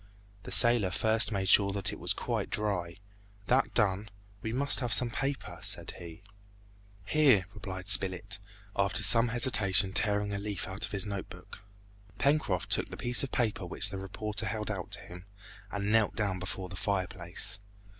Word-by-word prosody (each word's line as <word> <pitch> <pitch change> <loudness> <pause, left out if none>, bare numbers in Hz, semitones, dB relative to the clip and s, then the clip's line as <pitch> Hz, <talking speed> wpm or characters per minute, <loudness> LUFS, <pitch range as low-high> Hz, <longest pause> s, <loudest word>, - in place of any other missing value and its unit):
The - - -10
sailor 120 -5 +7
first 110 +5 +1
made 95 -2 -2
sure 100 +1 +5
that 100 -1 -2
it - - -9
was - - 0
quite - - -3
dry; 95 -5 -2 0.5
that 130 +6 +1
done, 105 -1 0 0.3
"We 110 - -4
must 140 +4 +1
have 125 -3 -3
some 120 0 +3
paper," 135 - -4
said 100 -4 0
he. 85 +1 -11 0.8
"Here," 135 -11 +3
replied 95 -4 -6
Spilett, 95 -2 +2 0.4
after - - +1
some 115 +1 +4
hesitation 105 -6 +2
tearing 105 -1 +1
a 100 - -3
leaf 100 -2 -4
out 95 +3 -2
of - - -14
his 100 0 +3
note 100 -2 -5
book. - - -12 0.6
Pencroft 140 - 0
took - - +2
the - - -9
piece 120 0 +1
of 135 - -4
paper 110 -5 -1
which 100 +3 +4
the 95 - -5
reporter 105 +3 -3
held 105 +1 -4
out 95 -4 -5
to - - -2
him, 90 +1 -12 0.4
and 100 0 -3
knelt 110 -1 +2
down 100 -4 -2
before 95 0 -5
the 95 - -9
fireplace. 95 0 -3
100 Hz, 175 wpm, -30 LUFS, 95-110 Hz, 0.8 s, sailor